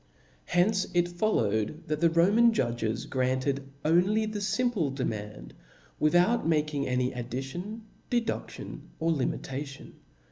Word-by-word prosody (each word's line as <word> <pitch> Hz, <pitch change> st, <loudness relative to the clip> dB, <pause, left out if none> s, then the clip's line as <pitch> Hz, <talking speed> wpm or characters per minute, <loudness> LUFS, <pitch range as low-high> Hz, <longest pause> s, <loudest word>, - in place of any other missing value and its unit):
^vi^ -, -, -35 dB, 0.5 s
Hence 190 Hz, +2 st, +3 dB
it 175 Hz, 0 st, +4 dB
followed, 155 Hz, -, 0 dB
that 150 Hz, -2 st, -1 dB
the 170 Hz, -, +4 dB
Roman 205 Hz, +8 st, +5 dB
judges 120 Hz, -, -1 dB
grant 130 Hz, 0 st, 0 dB
ed 140 Hz, -1 st, 0 dB, 0.2 s
only 185 Hz, +7 st, +3 dB
the 215 Hz, -1 st, -3 dB
fimplc 205 Hz, -, 0 dB
demand, 105 Hz, -, -4 dB, 0.5 s
without 175 Hz, +8 st, +3 dB
making 150 Hz, -3 st, +1 dB
any 125 Hz, 0 st, 0 dB
addition, 135 Hz, -, -5 dB, 0.3 s
dedudtion, 240 Hz, -2 st, -2 dB, 0.2 s
or 165 Hz, +1 st, +1 dB
limitation. 140 Hz, -1 st, -3 dB
155 Hz, 120 wpm, -29 LUFS, 130-195 Hz, 0.5 s, Roman